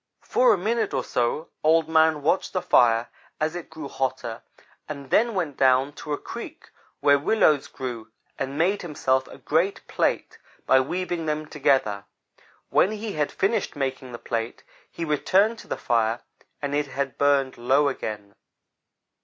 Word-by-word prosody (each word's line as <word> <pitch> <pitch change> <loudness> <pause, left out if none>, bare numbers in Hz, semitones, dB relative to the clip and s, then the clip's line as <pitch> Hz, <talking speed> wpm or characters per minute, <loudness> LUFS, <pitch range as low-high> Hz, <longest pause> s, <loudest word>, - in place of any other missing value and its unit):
"For 250 0 +4
a - - +3
minute 220 +3 -1
or - - 0
so 125 +6 -1
Old 160 +1 +4
man 160 -2 +3
watched 175 +5 +1
the 185 - 0
fire 120 -8 +4 0.3
as 155 +1 0
it 175 - -7
grew 160 -3 -7
hotter, 130 -4 -3 0.5
and 140 -3 -7
then 230 -1 +3
went 160 -7 -2
down 130 +2 +3
to 150 - -7
a 145 - 0
creek - - -9 0.3
where 145 0 +5
willows 150 -4 +3
grew 120 -4 -6 0.3
and 135 +1 -3
made 190 +5 +2
himself 130 -5 0
a - - -12
great 170 +6 0
plate - - -1 0.3
by 130 - +5
weaving 175 +3 -2
them 155 0 -1
together. 135 -10 +1 0.7
When 205 - +3
he 215 -1 -5
had 150 -1 -1
finished 205 -2 0
making 130 -2 -3
the 120 - -6
plate, 115 -1 -4 0.3
he 170 - -5
returned 195 +9 +2
to - - -13
the - - -3
fire, 115 0 0 0.4
and 140 0 -2
it 145 0 0
had 135 0 -4
burned 140 -3 +2
low 135 +4 +3
again. 105 -6 -4
145 Hz, 160 wpm, -25 LUFS, 130-170 Hz, 0.7 s, where